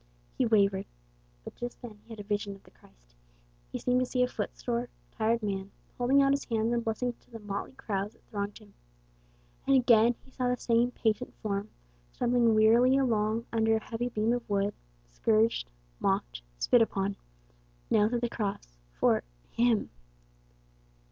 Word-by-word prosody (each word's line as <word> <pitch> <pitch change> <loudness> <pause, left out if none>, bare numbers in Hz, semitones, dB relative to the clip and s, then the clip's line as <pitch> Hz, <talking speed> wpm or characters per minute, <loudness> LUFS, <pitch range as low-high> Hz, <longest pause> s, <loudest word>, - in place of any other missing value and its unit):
He 255 - +1
wavered. 200 -3 +3 0.6
But - - -8
just 240 0 -6
then 225 -4 -10
he - - -27
had 225 -2 -9
a - - -5
vision 205 -1 -2
of 195 - -18
the - - -20
Christ. - - -25 0.6
He - - -3
seemed 250 0 +1
to 255 - +1
see 250 0 +1
a - - +2
footsore, 240 -1 -3 0.2
tired 225 0 0
man, 195 -1 -2 0.3
holding 270 +3 +4
out 275 - +4
his 280 0 0
hands 225 0 0
in 235 - +1
blessing 235 +2 -1
to - - -30
the 230 - -8
motley 205 +1 -5
crowds 205 -3 -3
that - - -28
thronged 205 -1 -4
him; 210 -2 -18 0.9
and 275 - +5
again 240 -2 +5
he 265 - -20
saw 255 -1 -1
the 250 0 +1
same 235 +1 +2
patient 230 0 -1
form 205 0 -2 0.4
stumbling 240 -2 +3
wearily 235 +5 +5
along 225 -3 +1
under 225 0 +3
a - - +1
heavy 240 +1 -3
beam 220 0 +1
of 245 -2 -4
wood, 200 0 +1 0.4
scourged, 215 - +2 0.3
mocked, - - -1 0.2
spit 240 - +4
upon, 195 -3 0 0.8
nailed 210 0 +4
to 240 - +1
the 240 - 0
cross, 195 - -4
for - - +2 0.3
him! 235 -2 +2
225 Hz, 170 wpm, -29 LUFS, 205-245 Hz, 0.9 s, and